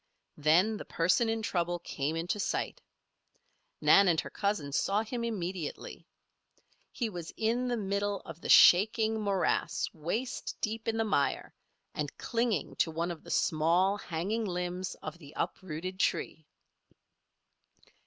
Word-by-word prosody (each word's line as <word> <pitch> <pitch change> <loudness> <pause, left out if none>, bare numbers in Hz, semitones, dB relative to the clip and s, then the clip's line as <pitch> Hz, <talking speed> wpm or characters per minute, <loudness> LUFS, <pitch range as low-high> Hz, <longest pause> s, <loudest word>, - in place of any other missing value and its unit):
Then 175 +9 +4
the - - -8
person 185 +8 +2
in 225 0 -1
trouble 175 -3 0
came 155 -2 -3
into 175 +5 -2
sight. - - -2 1.0
Nan 200 0 +6
and 165 -3 +3
her - - -9
cousin 200 -9 -1
saw 195 +9 +1
him 235 +2 -4
immediately. 185 -8 -4 0.8
He 240 - -2
was 175 -6 -7
in 235 +3 0
the 245 -1 0
middle 200 -1 -1
of 165 +1 -11
the - - -6
shaking 220 +4 +6
morass 195 -2 0
waist 195 +11 -3
deep 225 +1 -3
in 225 0 0
the 225 - +2
mire, 145 -10 0 0.4
and 150 -2 -4
clinging 230 - -1
to - - +2
one 165 +2 -2
of 165 - -8
the - - -12
small 170 +5 +2
hanging 205 +4 -2
limbs 180 0 -3
of 155 +2 -6
the 145 -3 -13
uprooted 185 +1 -4
tree. 155 -5 -1
185 Hz, 140 wpm, -30 LUFS, 165-220 Hz, 1.0 s, Nan